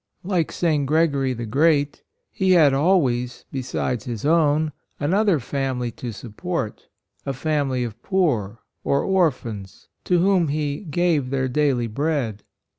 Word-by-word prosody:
Like 180 -4 0
St. 155 -5 0
Gregory 140 -4 +2
the 120 -1 -5
Great, 145 +4 +2 0.3
he 190 -1 +2
had 155 -6 +6
always, 135 -6 +1
besides 125 -3 -2
his 120 -2 -5
own, 155 -1 +3 0.3
another 190 +3 +2
family 130 -2 -2
to 120 +2 -6
support, 120 - -5 0.4
a 135 - -3
family 135 -2 0
of 115 -1 -6
poor, 120 - 0 0.2
or 140 - +1
or 190 -4 +4
phans, 105 -7 -9 0.2
to 180 - +3
whom 180 -1 +3
he 145 0 -1
" - - -7
gave 160 -7 +2
their 135 -1 0
daily 130 -2 +1
bread." 120 -3 -2
140 Hz, 140 wpm, -23 LUFS, 125-165 Hz, 0.4 s, had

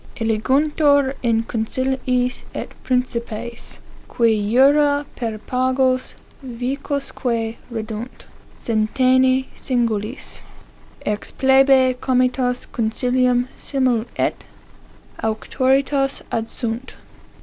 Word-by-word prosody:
' - - -18
Eliguntur 275 +5 +2
in 230 -2 +2
conciliis 250 +2 -1
et - - -5
principes, 235 -2 -3 0.3
qui 230 -2 +2 0.2
jura 285 +3 +4
per 225 -3 -3
pagos 255 +2 0 0.3
vicosque 250 -2 -3
reddunt, 225 +1 -6 0.3
centenii 255 +4 +2
singulis, 235 -1 -2 0.6
ex 210 0 -2
plebe 265 -1 +4
comites 250 -1 +1
comcilium 245 +2 +1
simul 255 -5 0
et - - -1 0.8
auctoritas 270 +5 +1
adsunt. 230 +2 -3
250 Hz, 75 wpm, -21 LUFS, 230-265 Hz, 0.8 s, jura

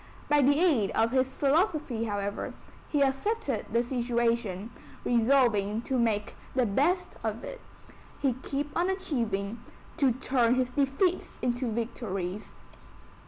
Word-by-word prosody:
By 295 -1 +5
the 285 +2 +4
aid 280 - +3
of 225 +1 +3
his 260 0 +1
philosophy, 290 - +1
however, 205 -1 -3 0.3
he 290 -2 +3
accepted 275 - -1
the 235 +2 +2
situation, 235 -4 -1 0.3
resolving 230 -3 +3
to 260 0 0
make 215 -3 0 0.2
the 255 -2 +3
best 290 - +1
of - - -2
it; - - -7 0.6
to 270 -3 +3
keep 285 +2 -3
on 350 +2 +2
achieving, 230 - -2 0.4
to 275 -6 +3
turn 250 -1 +2
his 255 -1 0
defeats 280 +7 0
into 245 -1 0
victories. 210 -4 -3
250 Hz, 125 wpm, -29 LUFS, 225-280 Hz, 0.6 s, By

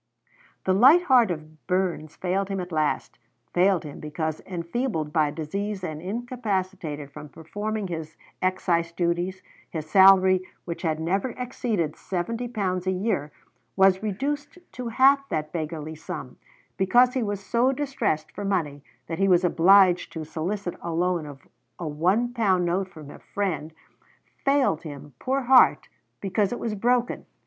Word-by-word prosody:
The 185 - +2
light 270 - +7
heart 250 - +5
of 155 -2 -7
Burns 180 -4 -1
failed 190 +2 -1
him 195 -1 -2
at 180 0 -6
last, 155 -2 -1 0.3
failed 185 0 +3
him 150 -2 -9
because, 155 +1 -3
enfeebled 170 - -3
by 155 -2 +3
disease 190 +6 -4
and 155 -3 -4
incapacitated 190 - -3
from 150 +1 -10
performing 205 +8 -4
his 160 -2 -6 0.2
excise 175 -2 +1
duties, 175 +2 -1 0.3
his 155 -2 -5
salary, 190 +1 +6 0.2
which 170 -1 -5
had 160 -3 -1
never 195 +9 -1
exceeded 220 -10 -2
seventy 230 +7 -3
pounds 190 -6 -2
a - - +3
year, 185 -6 -1 0.4
was 190 -1 +4
reduced 285 - -3
to 250 -1 -6
half 275 +4 +4
that 155 -1 -3
beggarly 155 -1 -4
sum; 160 - -7 0.4
because 240 +6 +4
he 260 - 0
was 205 -3 -2
so 235 +6 +1
distressed 270 - -2
for 205 - -6
money 165 -8 -1 0.2
that 165 0 -5
he 195 - +3
was 180 -1 +4
obliged 180 +1 +5
to 160 -1 -5
solicit 175 +5 -3
a 170 - -4
loan 170 -1 0
of 140 -2 -12 0.3
a 170 - -5
one 185 +11 +1
pound 190 -7 +2
note 185 +2 0
from 155 -5 -11
a - - -12
friend: 165 -7 -3 0.7
failed 275 - +2
him, 145 -3 -9
poor 270 +2 0
heart, 255 0 +5 0.3
because 195 +1 0
it 245 - -2
was 225 - -3
broken! 240 +4 0
185 Hz, 155 wpm, -25 LUFS, 160-215 Hz, 0.7 s, light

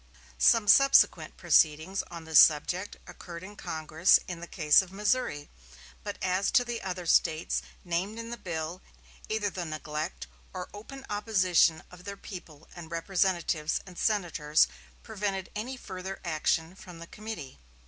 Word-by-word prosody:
Some 230 -3 +5
subsequent 275 +6 +5
proceedings 160 +5 +3
on 170 -1 -8
this 160 -1 +5
subject 175 +6 +3
occurred 170 0 -10
in 205 +2 -10
Congress 160 0 +2
in 175 -2 -6
the 170 - -8
case 155 -3 +4
of 190 -2 -10
Missouri; 200 -7 -1 0.6
but 205 -1 -5
as 185 +1 +1
to 245 -2 +4
the 240 -1 -4
other 180 -1 -5
States 160 -1 +2 0.2
named 180 +5 -2
in 230 0 -7
the - - -3
bill, 170 -2 -5 0.5
either 215 -2 -1
the 180 - -4
neglect 155 +1 -5 0.3
or 180 -1 -6
open 265 +6 -10
opposition 185 -6 +2
of 180 0 -13
their 200 0 -6
people 165 -6 -11
and 170 -2 -9
representatives 170 -2 0
and 180 -2 -12
senators 165 -8 +2 0.4
prevented 200 -3 -4
any 245 +5 -4
further 190 -3 -7
action 160 +1 0
from 180 -2 -12
the 165 - -9
committee. 200 - -8
180 Hz, 150 wpm, -29 LUFS, 160-205 Hz, 0.6 s, Some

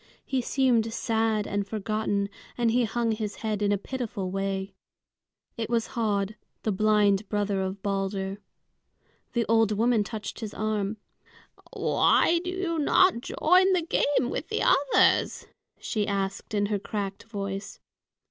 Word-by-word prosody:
He 265 -2 0
seemed 240 -3 +2
sad 225 -2 0
and 205 0 -2
forgotten, 215 -1 -1 0.3
and 235 -2 +2
he 240 +1 +3
hung 230 +1 0
his 215 -2 -3
head 210 -1 -1
in 205 0 +2
a 205 - +2
pitiful 215 -4 -4
way. 195 0 -2 0.8
It 225 -1 -3
was 235 -1 0
Höd, 210 -4 -1 0.3
the 215 - +1
blind 205 0 +2
brother 205 -2 0
of 190 +1 -4
Balder. 195 0 -2 0.9
The 235 -2 +1
old 225 -1 +3
woman 225 +1 +2
touched 210 -1 -6
his 220 -2 -6
arm. 215 -1 -1 0.8
"Why 340 0 +3
do 360 - -3
you 360 -3 -2
not 310 -2 +4
join 370 +8 +3
the 355 -2 +2
game 275 -6 +1
with - - -3
the - - -1
others?" - - +3 0.3
she 210 -3 -2
asked, 195 +1 -2
in 205 0 +2
her 205 0 -1
cracked 200 -1 -4
voice. 200 -3 -5
215 Hz, 145 wpm, -27 LUFS, 200-235 Hz, 0.9 s, not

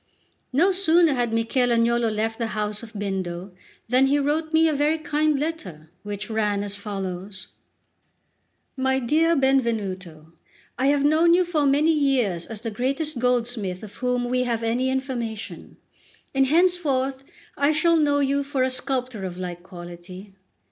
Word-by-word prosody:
No 330 +9 +3
sooner 345 -4 +4
had 240 -3 0
Michel 230 +3 +1
Agnolo 235 0 +2
left 220 +1 -2
the 230 - -1
house 210 0 -2
of 230 -1 -11
Bindo 190 -3 -4 0.4
than 255 +3 +4
he 280 +2 +3
wrote 300 +3 0
me 320 0 +4
a 315 - +1
very 295 +2 +1
kind 305 -1 0
letter, 185 - -5
which 205 -1 -5
ran 210 -3 0
as 205 0 -3
follows: 195 -2 -6 1.3
"My 265 0 +1
dear 315 +7 +2
Benvenuto, 200 - -1 0.5
I 265 - +2
have 285 0 +3
known 325 +3 +5
you 365 0 +3
for 310 -5 +1
many 295 +4 +3
years 255 - +1
as 220 -2 -7
the 230 -2 -4
greatest 270 +5 -2
goldsmith 235 -6 0
of 205 -1 -11
whom 250 -1 0
we 250 +1 0
have 230 -2 -1
any 240 +3 0
information; 245 -5 -4 0.6
and 270 -1 +3
henceforward 285 -5 +1 0.3
I 285 +1 +2
shall 335 +2 +3
know 290 -2 +2
you 280 +1 +1
for 275 -2 -1
a 260 - +1
sculptor 255 -4 -2
of 180 -2 -5
like 175 -1 -5
quality. 180 +2 -11
250 Hz, 155 wpm, -24 LUFS, 205-285 Hz, 1.3 s, known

